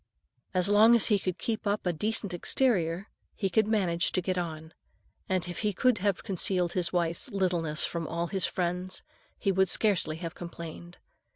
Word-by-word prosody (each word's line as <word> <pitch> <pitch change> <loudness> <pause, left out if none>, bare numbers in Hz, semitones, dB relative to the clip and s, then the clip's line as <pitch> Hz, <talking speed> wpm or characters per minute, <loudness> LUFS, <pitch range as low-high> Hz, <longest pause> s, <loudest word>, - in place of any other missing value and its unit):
As 180 0 +2
long 215 +3 +6
as 230 - +4
he 200 - +3
could 185 -2 -3
keep 220 -2 -3
up 205 0 -1
a 180 - +1
decent 210 +2 -2
exterior, 180 -2 +1 0.3
he 195 -3 -1
could 215 +3 +3
manage 185 -5 +1
to - - +2
get 185 +1 -1
on; 160 -2 -5 0.6
and 185 -2 0
if 175 - -5
he 210 -2 0
could 250 +3 +2
have 200 -1 0
concealed 180 -2 0
his 180 -2 0
wife's 170 -2 0
littleness 175 -5 0
from 165 -2 -4
all 170 +1 -2
his 190 +1 0
friends, 180 +1 -3 0.3
he 195 - +1
would 190 0 +2
scarcely 195 -7 +3
have 165 0 -5
complained. 170 0 -9
180 Hz, 180 wpm, -29 LUFS, 170-200 Hz, 0.6 s, long